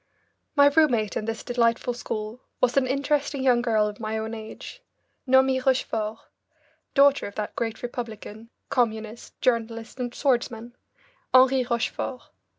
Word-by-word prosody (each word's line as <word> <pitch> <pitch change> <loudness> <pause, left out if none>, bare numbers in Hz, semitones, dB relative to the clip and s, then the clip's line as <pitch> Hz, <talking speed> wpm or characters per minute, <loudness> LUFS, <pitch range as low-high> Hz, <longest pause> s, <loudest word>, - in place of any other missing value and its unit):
My 285 -1 +7
roommate 285 -8 +3
in 215 - -2
this 225 0 -4
delightful 240 0 +1
school 220 0 -5 0.2
was 250 -1 +2
an 270 -2 +3
interesting 280 +1 0
young 245 -2 +4
girl 220 -3 +2
of 210 0 -7
my 220 0 -3
own 220 +1 -4
age, 220 - -9 0.5
Noemie 265 0 +4
Rochefort, 225 -5 0 0.8
daughter 280 0 +5
of 200 - -11
that 210 -1 -4
great 225 0 -3
Republican, 230 -2 -7 0.2
Communist, 220 -3 -2
journalist, 230 0 -1
and 245 -1 -2
swordsman, 240 -3 -1 0.6
Henri 260 0 +6
Rochefort. 240 +1 -2
240 Hz, 135 wpm, -25 LUFS, 220-260 Hz, 0.8 s, My